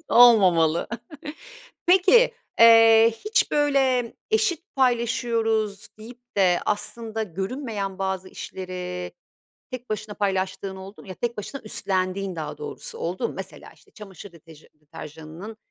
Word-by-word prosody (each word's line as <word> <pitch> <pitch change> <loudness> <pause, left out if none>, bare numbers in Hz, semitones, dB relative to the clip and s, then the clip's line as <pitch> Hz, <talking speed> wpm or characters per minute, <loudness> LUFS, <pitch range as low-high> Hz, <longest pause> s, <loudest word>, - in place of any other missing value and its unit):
Olmamalı. 185 -9 +5 1.0
Peki, 385 +7 +5 0.3
eee, 225 0 +7
hiç, 435 +1 +2
böyle, 270 -5 +1 0.2
eşit 410 -9 0
paylaşıyoruz 230 -4 0
deyip 245 +2 -14
de 180 -3 +3
aslında 220 +1 -3
görünmeyen 200 - -4
bazı 190 -1 -3
işleri 180 -1 -6 0.6
tek 250 -2 -8
başına 215 0 -4
paylaştığın 190 -1 -2
oldu 195 +2 -11
mu? - - -16
Ya, 185 - -6
tek 235 +4 -3
başına 265 +7 -6
üstlendiğin 190 -2 -2
daha 155 -2 -6
doğrusu, 455 +2 -8
oldu 475 - -2
mu? - - -9
Mesela, - - -8
işte, 415 - -25
çamaşır 200 - -12
deteja 160 -2 -17
deterjanının 155 +6 -10
215 Hz, 120 wpm, -24 LUFS, 185-245 Hz, 1.0 s, eee